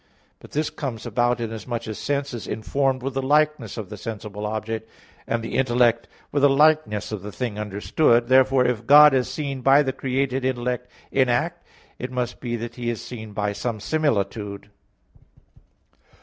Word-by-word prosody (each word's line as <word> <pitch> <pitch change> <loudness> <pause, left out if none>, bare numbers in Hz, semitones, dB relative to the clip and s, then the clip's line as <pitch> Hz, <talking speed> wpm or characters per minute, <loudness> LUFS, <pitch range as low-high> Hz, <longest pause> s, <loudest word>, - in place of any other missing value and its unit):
But - - -15
this 150 +1 -1
comes 125 -7 -5
about 120 +1 +1
inasmuch 115 +1 -4
as 110 - -5
sense 140 -1 -2
is 120 - -6
informed 130 +3 -1
with 135 0 -3
the 135 - -1
likeness 150 -5 +1
of 105 -4 -6
the 105 - -6
sensible 105 -2 -6
object, 110 +1 -4 0.4
and 115 0 -1
the 115 - -5
intellect 120 -2 +2 0.2
with 145 - 0
the 145 - +6
likeness 150 -7 +3
of 105 -3 -4
the 105 +2 -7
thing 110 -2 -4
understood. 115 +4 +2
Therefore, 130 0 +4
if 120 -4 -1
God 150 0 +9
is 130 -2 +1
seen 140 -3 -4
by 135 +3 +5
the 135 -1 -2
created 135 0 -1
intellect 125 -1 -2 0.2
in 130 -2 +3
act, 170 +9 -1 0.3
it 125 - -4
must 125 -1 -3
be 120 -1 -2
that 120 +1 -6
He 120 -1 -2
is 115 -3 -3
seen 110 -4 -8
by 105 0 -1
some 115 +1 -3
similitude. 105 -7 -1
125 Hz, 175 wpm, -23 LUFS, 110-135 Hz, 0.4 s, God